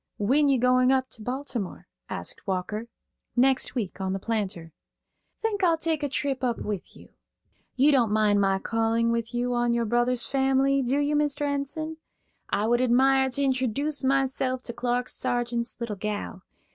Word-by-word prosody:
"When 275 Hz, +8 st, +3 dB
you 270 Hz, -, +4 dB
going 255 Hz, +1 st, +4 dB
up 260 Hz, -1 st, +1 dB
to 225 Hz, -, -7 dB
Baltimore?" 250 Hz, -4 st, -4 dB, 0.2 s
asked -, -, -6 dB
Walker. 195 Hz, +4 st, -2 dB, 0.5 s
"Next 260 Hz, +1 st, +3 dB
week, 200 Hz, -5 st, -3 dB
on 190 Hz, 0 st, -1 dB
'The 195 Hz, -, -2 dB
Planter.'" 190 Hz, -7 st, -3 dB, 0.7 s
"Think 420 Hz, -3 st, -1 dB
I'll 335 Hz, -2 st, +4 dB
take 320 Hz, -1 st, -1 dB
a 290 Hz, -, -1 dB
trip 270 Hz, -1 st, -2 dB
up 240 Hz, -2 st, +1 dB
with 205 Hz, -4 st, -5 dB
you. -, -, -15 dB, 0.7 s
You 275 Hz, +4 st, +5 dB
don't 245 Hz, -6 st, +3 dB
mind 210 Hz, -1 st, +3 dB
my 195 Hz, -1 st, +2 dB
calling 225 Hz, +2 st, +1 dB
with 230 Hz, -1 st, -2 dB
you 245 Hz, +1 st, 0 dB
on 240 Hz, 0 st, +1 dB
your 235 Hz, 0 st, +1 dB
brother's 240 Hz, +2 st, +1 dB
family, 270 Hz, 0 st, +2 dB
do 260 Hz, +2 st, 0 dB
you, 290 Hz, +1 st, +1 dB
Mr. 295 Hz, -1 st, 0 dB
Enson? 290 Hz, +3 st, -3 dB, 0.5 s
I 205 Hz, -, 0 dB
would 240 Hz, +2 st, +2 dB
admire 265 Hz, +2 st, +4 dB
to 280 Hz, +2 st, -1 dB
introduce 270 Hz, +3 st, 0 dB
myself 265 Hz, -1 st, +1 dB
to 235 Hz, -, -5 dB
Clark 245 Hz, +1 st, -1 dB
Sargeant's 240 Hz, -1 st, -2 dB
little 230 Hz, -4 st, -4 dB
gal. 205 Hz, -2 st, -4 dB
250 Hz, 170 wpm, -26 LUFS, 225-275 Hz, 0.7 s, You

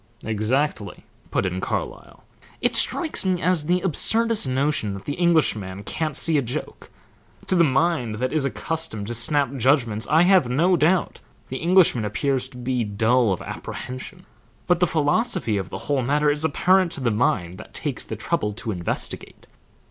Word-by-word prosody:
"Exactly," 110 Hz, -1 st, -2 dB, 0.2 s
put -, -, -1 dB
in 95 Hz, 0 st, -3 dB
Carlyle. -, -, -5 dB, 0.4 s
"It -, -, 0 dB
strikes 325 Hz, -4 st, +2 dB
me 185 Hz, -2 st, 0 dB
as 175 Hz, -4 st, +1 dB
the 180 Hz, +1 st, +1 dB
absurdest 220 Hz, +3 st, +2 dB
notion 130 Hz, -6 st, 0 dB
that 100 Hz, -, -10 dB
the 145 Hz, -, -3 dB
Englishman 110 Hz, -, 0 dB
can't 155 Hz, +5 st, -2 dB
see 160 Hz, -3 st, +4 dB
a -, -, 0 dB
joke. 130 Hz, +5 st, -6 dB, 0.6 s
To -, -, +1 dB
the 170 Hz, -, +5 dB
mind 135 Hz, -5 st, +1 dB
that 130 Hz, +6 st, -3 dB
is 155 Hz, -3 st, +1 dB
accustomed 150 Hz, -5 st, -3 dB
to 120 Hz, -, -4 dB
snap 140 Hz, +3 st, +2 dB
judgments 120 Hz, -4 st, +1 dB
I 160 Hz, +3 st, +4 dB
have 180 Hz, -8 st, +4 dB
no 170 Hz, +9 st, +2 dB
doubt 170 Hz, +3 st, +1 dB, 0.3 s
the 130 Hz, -, -4 dB
Englishman 170 Hz, -, +3 dB
appears 130 Hz, +5 st, -1 dB
to 130 Hz, -, -14 dB
be 125 Hz, 0 st, -2 dB
dull 110 Hz, +2 st, +1 dB
of 95 Hz, -, -3 dB
apprehension, 130 Hz, +9 st, -7 dB, 0.4 s
but 175 Hz, -2 st, +2 dB
the 180 Hz, -, +3 dB
philosophy 155 Hz, -, +1 dB
of 95 Hz, -1 st, -4 dB
the -, -, -6 dB
whole 140 Hz, -2 st, 0 dB
matter 145 Hz, +4 st, +1 dB
is 150 Hz, +1 st, 0 dB
apparent 180 Hz, +4 st, +2 dB
to 140 Hz, -, -4 dB
the 120 Hz, -3 st, +1 dB
mind 95 Hz, -5 st, -1 dB
that -, -, -13 dB
takes -, -, -4 dB
the -, -, -6 dB
trouble 105 Hz, 0 st, -2 dB
to 110 Hz, +1 st, -5 dB
investigate. 90 Hz, -3 st, -4 dB
140 Hz, 170 wpm, -23 LUFS, 115-165 Hz, 0.6 s, the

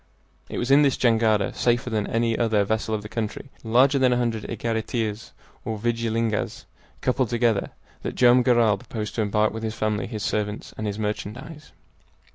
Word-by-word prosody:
It -, -, -5 dB
was 120 Hz, +2 st, -1 dB
in 140 Hz, +2 st, +7 dB
this 140 Hz, -3 st, +3 dB
jangada, 110 Hz, -4 st, +2 dB
safer 120 Hz, 0 st, 0 dB
than 105 Hz, -2 st, -1 dB
any 115 Hz, 0 st, +1 dB
other 110 Hz, -3 st, +2 dB
vessel 110 Hz, +1 st, -1 dB
of 105 Hz, -, -5 dB
the -, -, -6 dB
country, 115 Hz, +4 st, -5 dB
larger 130 Hz, +5 st, +4 dB
than 130 Hz, -1 st, +4 dB
a 125 Hz, -, +2 dB
hundred 115 Hz, -3 st, -1 dB
egariteas 115 Hz, -1 st, -3 dB, 0.3 s
or 110 Hz, 0 st, -3 dB
vigilingas 115 Hz, -1 st, -1 dB, 0.4 s
coupled 125 Hz, -2 st, +1 dB
together, 115 Hz, -4 st, +1 dB, 0.3 s
that -, -, -4 dB
Joam 125 Hz, 0 st, +6 dB
Garral 115 Hz, -5 st, +3 dB
proposed 105 Hz, 0 st, -5 dB
to 115 Hz, -, -1 dB
embark 105 Hz, +1 st, +1 dB
with 110 Hz, -, -5 dB
his 110 Hz, -1 st, -3 dB
family, 105 Hz, -1 st, -1 dB
his 110 Hz, -2 st, -5 dB
servants, 105 Hz, 0 st, -2 dB
and 110 Hz, -, -4 dB
his 100 Hz, 0 st, -3 dB
merchandise. 110 Hz, +8 st, -5 dB
115 Hz, 175 wpm, -24 LUFS, 105-120 Hz, 0.4 s, in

